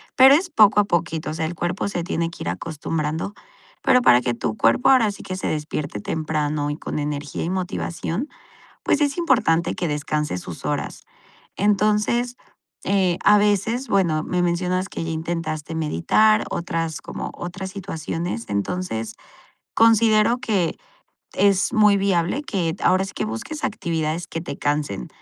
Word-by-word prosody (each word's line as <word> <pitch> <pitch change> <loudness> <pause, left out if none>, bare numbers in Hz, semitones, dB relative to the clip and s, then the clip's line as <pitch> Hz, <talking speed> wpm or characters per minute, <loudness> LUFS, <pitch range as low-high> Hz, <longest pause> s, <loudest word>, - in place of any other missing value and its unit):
pero 265 +1 +8
es 350 +5 +2
poco 210 - +5
a 205 - +4
poquito, 165 -4 -1
o - - -3
sea, 160 -1 -1
el 160 - -3
cuerpo 175 +3 -2
se 175 -3 -3
tiene 170 -1 -2
que - - -12
ir 85 - -2
acostumbrando. 155 - -3 0.5
Pero 250 - +5
para 125 - +6
que 125 -1 -1
tu 110 -2 -3
cuerpo 250 - +3
ahora 245 -6 +5
sí 200 - -10
que 185 - -5
se 185 - -5
despierte 150 -5 -3
temprano, 150 +2 -2
y 145 - -4
con - - -5
energía 145 -1 -3
y 170 - -2
motivación, 185 - -3 0.5
pues, 295 - +1
es 285 -1 +1
importante 240 - +2
que 175 - -2
descanses 150 -7 -2
sus - - -8
horas. - - -3 0.5
Entonces, 210 +4 +1 0.5
eh, 185 -3 +2
a 210 - +7
veces, 210 +5 +1
bueno, 170 -7 +2
me 180 +2 -1
mencionas 180 +2 0
que 165 - -5
ya 165 - -4
intentaste 160 -1 -3
meditar, 160 - +3
otras 165 -2 -3
como - - -6
otras 190 +2 -6
situaciones. 170 - -4
Entonces, 110 - -3 0.6
considero 225 0 +4
que 205 -9 0 0.6
es 200 -1 +2
muy 210 -2 +5
viable 195 - +1
que, 175 - -2
ahora 185 +1 +4
sí, 195 - -6
que - - -2
busques 115 - -5
actividades 165 -3 -2
que 165 - -4
te 160 -4 -6
cansen. 145 - -2
175 Hz, 160 wpm, -22 LUFS, 155-205 Hz, 0.6 s, pero